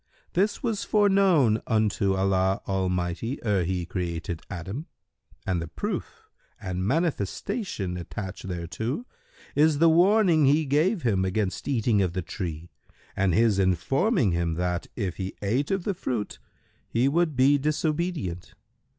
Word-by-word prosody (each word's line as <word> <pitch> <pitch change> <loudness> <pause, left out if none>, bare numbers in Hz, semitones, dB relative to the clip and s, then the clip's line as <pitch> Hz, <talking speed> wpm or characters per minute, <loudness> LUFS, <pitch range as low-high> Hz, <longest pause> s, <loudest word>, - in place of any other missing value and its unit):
This 205 +7 +1
was 225 -4 -1
foreknown 195 - +3
unto 105 -3 +1
Allah 95 0 +1
Almighty 95 +5 -1
ere 100 -5 +1
He 90 0 -2
created 85 -2 -4
Adam, 100 - -6 0.6
and 90 -3 0
the 85 - -5
proof - - -5 0.3
and 90 0 -3
manifestation 135 - -2
attached 95 +2 -6
thereto 95 - -4 0.5
is 150 0 +4
the 165 +2 +5
warning 175 -2 +4
He 150 +3 +3
gave 160 +8 +1
him 100 -6 +2
against 95 +1 -2
eating 115 -6 +2
of 90 -3 0
the 95 -1 -2
tree 85 -1 -6 0.4
and 95 -3 +2
His 110 -2 +3
informing 110 - +2
him 85 -1 0
that, 90 0 -2
if 95 -7 -3
he 95 0 -4
ate 125 +8 0
of 195 -2 0
the 200 - -1
fruit 120 - -4 0.5
he 120 +3 +2
would 160 +1 +1
be 135 +3 +4
disobedient. 150 - -2
105 Hz, 135 wpm, -26 LUFS, 90-155 Hz, 0.6 s, the